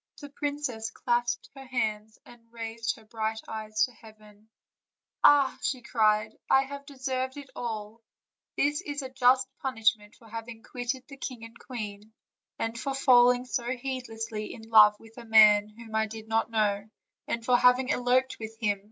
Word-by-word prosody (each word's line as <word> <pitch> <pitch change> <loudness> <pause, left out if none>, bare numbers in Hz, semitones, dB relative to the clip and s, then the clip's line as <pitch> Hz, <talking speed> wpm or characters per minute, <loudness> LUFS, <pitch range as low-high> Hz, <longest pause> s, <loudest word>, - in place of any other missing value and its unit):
The 290 - -9
princess 285 -6 -3
clasped 240 0 -1
her 270 -1 -11
hands; 220 -4 -2
and 240 -1 -16
raising 230 0 -3
her - - -26
bright 220 0 -3
eyes 215 -1 -1
to 250 - -12
heaven: 215 -2 -18 0.7
"Ah!" 280 -2 +5 0.3
cried 215 -2 +3
she, - - -28
"I 265 - +5
have 280 +1 -9
deserved 260 -1 -3
it 285 -2 -10
all; 220 -1 -5 0.6
this 295 +3 +1
is 290 -5 -5
a 260 - -6
just 260 +1 +4
punishment 220 -4 0
for 230 - -19
having 225 +1 -8
quitted 245 +1 -4
the 275 - -11
king 250 -3 -6
and 230 +1 -14
queen, 215 -3 -7 0.4
and 225 +1 -3
for 275 +2 -3
falling 250 -2 +5
so 245 -1 -3
heedlessly 230 -4 -5
in 225 -1 -13
love 210 -1 +7
with 225 +2 -14
a - - -9
man 215 -2 +6
whom 220 +1 -13
I 220 0 +1
did 220 0 -9
not 225 0 +1
know* 210 -2 0 0.4
and 230 0 -3
for 250 - +4
having 250 +2 +4
eloped 255 0 +1
with 225 0 -7
him. 205 -3 0
230 Hz, 170 wpm, -28 LUFS, 220-255 Hz, 0.7 s, love